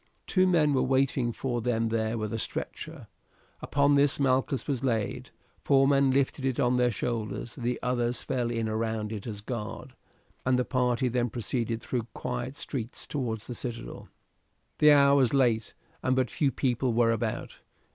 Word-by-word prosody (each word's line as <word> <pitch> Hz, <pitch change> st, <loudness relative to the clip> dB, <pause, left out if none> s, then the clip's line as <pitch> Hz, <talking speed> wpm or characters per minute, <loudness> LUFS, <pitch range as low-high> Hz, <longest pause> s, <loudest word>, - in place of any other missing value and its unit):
Two 185 Hz, -1 st, +3 dB
men 155 Hz, -5 st, +3 dB
were 130 Hz, -, +2 dB
waiting 130 Hz, -2 st, +1 dB
for 120 Hz, 0 st, -2 dB
them 115 Hz, -1 st, 0 dB
there 110 Hz, 0 st, -1 dB
with 110 Hz, -1 st, -3 dB
a 115 Hz, -, -2 dB
stretcher. -, -, -5 dB, 0.6 s
Upon 145 Hz, 0 st, +2 dB
this 140 Hz, 0 st, +3 dB
Malchus 135 Hz, 0 st, +1 dB
was 135 Hz, -3 st, -1 dB
laid, 115 Hz, -5 st, -1 dB, 0.3 s
four 135 Hz, -1 st, +4 dB
men 140 Hz, -1 st, +4 dB
lifted 135 Hz, +1 st, +1 dB
it 130 Hz, -2 st, 0 dB
on 125 Hz, 0 st, +3 dB
their 125 Hz, 0 st, +3 dB
shoulders, 115 Hz, +1 st, -3 dB
the 125 Hz, -2 st, -2 dB
others 125 Hz, -1 st, -1 dB
fell 125 Hz, -3 st, -1 dB
in 115 Hz, -1 st, -1 dB
round 110 Hz, -1 st, -2 dB
it 105 Hz, 0 st, -6 dB
as 105 Hz, -2 st, -5 dB
a -, -, -27 dB
guard, 115 Hz, +2 st, -6 dB, 0.5 s
and 130 Hz, 0 st, +2 dB
the 125 Hz, -, +1 dB
party 125 Hz, -1 st, +1 dB
then 120 Hz, 0 st, 0 dB
proceeded 115 Hz, 0 st, -2 dB
through 120 Hz, -3 st, -2 dB
quiet 125 Hz, +3 st, -4 dB
streets 120 Hz, -3 st, -4 dB
towards 115 Hz, -7 st, -3 dB
the 125 Hz, -, -5 dB
citadel. 120 Hz, -1 st, -7 dB, 0.7 s
The 150 Hz, 0 st, +7 dB
hour 140 Hz, -1 st, +6 dB
was 130 Hz, -1 st, +3 dB
late 120 Hz, -5 st, +2 dB, 0.3 s
and 130 Hz, -, +1 dB
but 130 Hz, -3 st, +1 dB
few 140 Hz, -3 st, +1 dB
people 125 Hz, -1 st, 0 dB
were 115 Hz, 0 st, +3 dB
about. 115 Hz, -1 st, -3 dB
125 Hz, 175 wpm, -28 LUFS, 115-135 Hz, 0.7 s, The